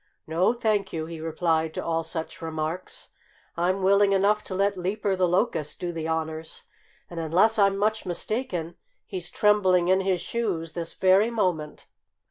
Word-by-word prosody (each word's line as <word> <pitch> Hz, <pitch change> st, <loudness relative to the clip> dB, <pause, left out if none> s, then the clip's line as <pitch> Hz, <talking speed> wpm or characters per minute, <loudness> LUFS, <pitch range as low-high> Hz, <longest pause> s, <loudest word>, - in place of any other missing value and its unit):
"No, 165 Hz, +6 st, +2 dB
thank 215 Hz, -4 st, 0 dB
you!" 160 Hz, -1 st, -3 dB
he 165 Hz, 0 st, -8 dB
replied 160 Hz, 0 st, 0 dB
to -, -, -4 dB
all 165 Hz, 0 st, 0 dB
such 160 Hz, +2 st, -6 dB
remarks. 160 Hz, +2 st, -5 dB, 0.5 s
"I'm 185 Hz, +3 st, 0 dB
willing 200 Hz, +1 st, +4 dB
enough 205 Hz, +2 st, +3 dB
to 185 Hz, -, -5 dB
let 200 Hz, +1 st, +1 dB
Leaper 195 Hz, +2 st, -1 dB
the 185 Hz, -1 st, +2 dB
Locust 175 Hz, -4 st, 0 dB
do 175 Hz, -1 st, -3 dB
the 165 Hz, -1 st, -4 dB
honors. 160 Hz, 0 st, -4 dB, 0.4 s
And 170 Hz, -, -7 dB
unless 185 Hz, +8 st, +3 dB
I'm 195 Hz, -1 st, +4 dB
much 215 Hz, +2 st, 0 dB
mistaken, 180 Hz, -3 st, -3 dB, 0.3 s
he's 180 Hz, -2 st, -4 dB
trembling 185 Hz, -4 st, +3 dB
in 190 Hz, +1 st, +4 dB
his 190 Hz, -2 st, 0 dB
shoes 180 Hz, -9 st, -3 dB
this 170 Hz, -1 st, -5 dB
very 190 Hz, +4 st, +4 dB
moment." 180 Hz, -9 st, -2 dB
180 Hz, 160 wpm, -26 LUFS, 165-200 Hz, 0.5 s, willing